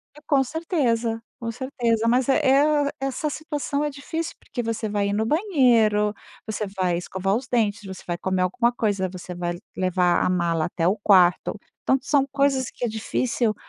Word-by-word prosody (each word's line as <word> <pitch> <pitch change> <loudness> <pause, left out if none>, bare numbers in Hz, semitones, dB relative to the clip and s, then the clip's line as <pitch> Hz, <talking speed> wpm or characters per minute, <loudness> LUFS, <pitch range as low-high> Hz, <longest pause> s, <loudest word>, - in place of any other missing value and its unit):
E 300 - -14
com 275 -2 +4
certeza, 245 -7 -1 0.2
com 230 -1 -3
certeza, 235 -2 -1
mas 250 +2 +2
é 270 - +5
é 285 +1 +4
essa 270 +3 -2
situação 295 -2 -3
é 295 - 0
difícil, 320 +4 -5
porque 245 - -5
você 230 -1 -2
vai 205 -1 0
ir - - -1
no 220 +2 0
banheiro, 235 - +3 0.3
você 215 -2 -3
vai 185 -3 -1
escovar 190 +3 -1
os 255 +2 -3
dentes, 220 -4 0
você 190 -1 -9
vai 175 - -2
comer 185 0 0
alguma 235 +6 +1
coisa, 205 -6 -1
você 180 0 -8
vai 175 0 -3 0.2
levar 180 -1 +2
a - - +1
mala 170 -3 +1
até 170 -1 -1
o 190 - +3
quarto, 190 0 +3 0.2
tanto 265 0 +1
são 275 -2 +2
coisas 275 -2 +1
que 245 - -4
é - - 0
difícil 225 0 -1
230 Hz, 185 wpm, -24 LUFS, 190-270 Hz, 0.3 s, é